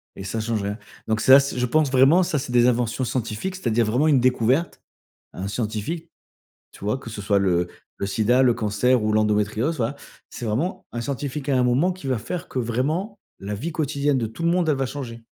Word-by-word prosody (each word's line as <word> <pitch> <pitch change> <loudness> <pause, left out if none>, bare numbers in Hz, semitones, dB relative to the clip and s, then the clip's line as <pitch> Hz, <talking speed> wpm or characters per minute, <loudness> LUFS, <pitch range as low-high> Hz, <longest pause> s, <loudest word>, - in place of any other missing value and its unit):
et 95 - -8
ça 105 +4 -3
change 110 -2 -2
rien. 105 +3 -3 0.3
Donc 110 0 0
c'est 130 - +6
assez 140 -2 +3
je 125 - +2
pense 150 0 +2
vraiment 140 +8 +5
ça, 150 -4 -1
c'est 125 - -6
des 120 0 +4
inventions 120 +1 0
scientifiques, 120 - -3
c'est-à-dire 120 - +1
vraiment 125 +8 +2
une 140 -4 +5
découverte 130 +5 +1 0.5
à - - -9
un 100 - -3
scientifique, 115 +10 -3 0.6
tu - - -12
vois? 105 +6 0
Que 115 - -10
ce 105 -2 -6
soit 100 0 +2
le 90 -2 +1 0.3
le 100 - -3
sida, 115 +6 +2
le 125 -2 +5
cancer 110 +3 +1
ou 105 - 0
l'endométriose, 110 +7 +1
voilà. 120 +4 -1 0.3
C'est 120 - -8
vraiment 125 - -2
un 120 - -3
scientifique 140 +2 -4
à 135 - +2
un 125 - +3
moment 135 +9 +2
qui 180 -6 -10
va 130 -4 0
faire 175 +11 -5
que 130 - -5
vraiment 150 - -1 0.2
la 100 +2 -4
vie 155 +11 -4
quotidienne 145 -2 0
de 115 - -1
tout 115 +10 -9
le 170 - +3
monde, 175 -2 +1
elle 145 - +3
va 135 - 0
changer. 120 -4 -6
125 Hz, 225 wpm, -23 LUFS, 110-145 Hz, 0.6 s, c'est